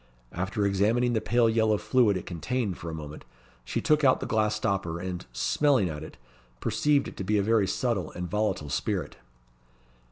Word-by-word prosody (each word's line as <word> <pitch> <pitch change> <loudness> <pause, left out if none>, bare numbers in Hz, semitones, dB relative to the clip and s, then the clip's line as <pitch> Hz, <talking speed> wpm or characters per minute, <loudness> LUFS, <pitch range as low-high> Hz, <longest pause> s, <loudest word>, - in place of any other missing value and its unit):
After 95 +4 -2
examining 110 +5 +2
the 110 - +1
pale 120 0 +3
yellow 110 -1 +2
fluid 115 -4 +2
it 90 - -7
contained 95 - -3
for 85 - -6
a - - -5
moment, 75 -1 -8 0.4
she - - -3
took 155 -1 +2
out 130 -2 +5
the - - -4
glass 105 -1 +1
stopper, 95 -5 -1
and, 90 -4 -5
smelling 120 - +2
at 75 -1 -6
it, - - -11 0.4
perceived 145 - +1
it - - -9
to - - -3
be 105 +3 +1
a 100 - +2
very 110 -2 +3
subtle 100 -3 -1
and 90 0 -4
volatile 105 -6 -1
spirit. 80 +2 -2
100 Hz, 185 wpm, -27 LUFS, 90-115 Hz, 0.4 s, out